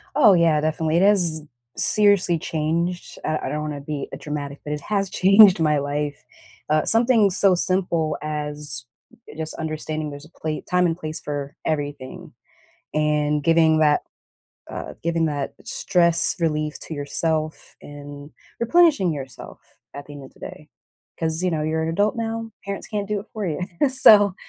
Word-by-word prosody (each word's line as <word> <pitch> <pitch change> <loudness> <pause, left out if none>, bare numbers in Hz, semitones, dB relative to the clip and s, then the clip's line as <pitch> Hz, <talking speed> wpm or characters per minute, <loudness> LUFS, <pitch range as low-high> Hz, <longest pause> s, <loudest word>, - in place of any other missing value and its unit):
Oh, 235 -9 +6
yeah 165 -3 +3
definitely 155 +1 0
it - - +3
has 180 -6 +3 0.4
seriously 200 -5 +4
changed 165 +3 -3
uh, 155 0 -1
I - - -4
don't 150 +1 -3
wanna 150 -2 -5
be 145 -1 -5
a - - -6
dramatic, 145 -1 -6
but 150 - -4
it 150 - -5
has 200 +2 -1
changed 195 0 +6
my 155 -2 +2
life. 145 +1 -3 0.5
Uh, 155 0 +2
something 225 -2 +4
so 190 0 +3
simple 175 -4 0
as 150 -4 -5 0.5
just 160 0 -4
understanding 155 -1 -4
there's 145 +1 -10
a - - -17
pla 155 -2 -5
time 180 0 +3
and 165 -1 0
place 155 -1 -4
for 145 0 -5
everything 145 -4 -4 0.6
and, 150 -1 0
giving 160 -1 +4
that 150 -1 +3 0.7
uh, - - -6
giving 165 0 0
that 145 -3 -3
stress 170 -2 +1
relief 155 -2 -1
to - - -7
yourself 155 +2 -2
and, 145 0 -11 0.3
replenishing 280 - +3
yourself 135 -5 -9 0.3
at 140 - -8
the 145 - -11
end 145 -1 -10
of - - -17
the - - -23
day 150 0 -10 0.5
'cause, 160 +1 -1
you 180 - +1
know, 155 -2 -1
you're 160 +1 -1
an 160 - -2
adult 205 +7 +1
now, 225 0 -4
parents 200 0 -5
can't 205 -2 -3
do 210 0 -1
it 200 - -11
for 215 -3 -4
you. 155 -4 -3 0.3
So, 205 -7 +6
160 Hz, 165 wpm, -22 LUFS, 150-185 Hz, 0.7 s, Oh